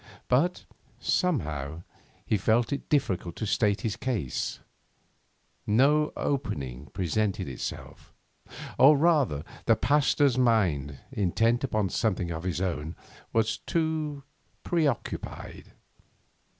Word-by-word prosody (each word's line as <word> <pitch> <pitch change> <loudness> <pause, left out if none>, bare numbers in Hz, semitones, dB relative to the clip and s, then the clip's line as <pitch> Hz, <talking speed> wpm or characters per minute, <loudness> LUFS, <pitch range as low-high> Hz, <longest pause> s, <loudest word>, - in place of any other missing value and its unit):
But, 155 +9 +1 0.3
somehow, 80 - -1 0.4
he - - +1
found 115 +6 +2
it 140 - -5
difficult 95 - 0
to 110 - -3
state 105 -1 +1
his 110 -4 -2
case; 110 - -2 1.1
no 145 +8 +4
opening 70 - -3
presented 95 +2 -1
itself; 65 - -7 0.7
or, 145 +2 +8
rather, 145 - +2 0.2
the - - +6
Pasteur's 145 -2 +3
mind, 85 - +2
intent 115 +2 +1
upon 110 -7 0
something 95 -5 0
of 80 +1 -5
his 90 -2 -1
own, 80 -4 -2 0.4
was 110 -1 +1
too 155 -3 -2 0.4
preoccupied. 155 -7 -2
110 Hz, 100 wpm, -28 LUFS, 85-140 Hz, 1.1 s, or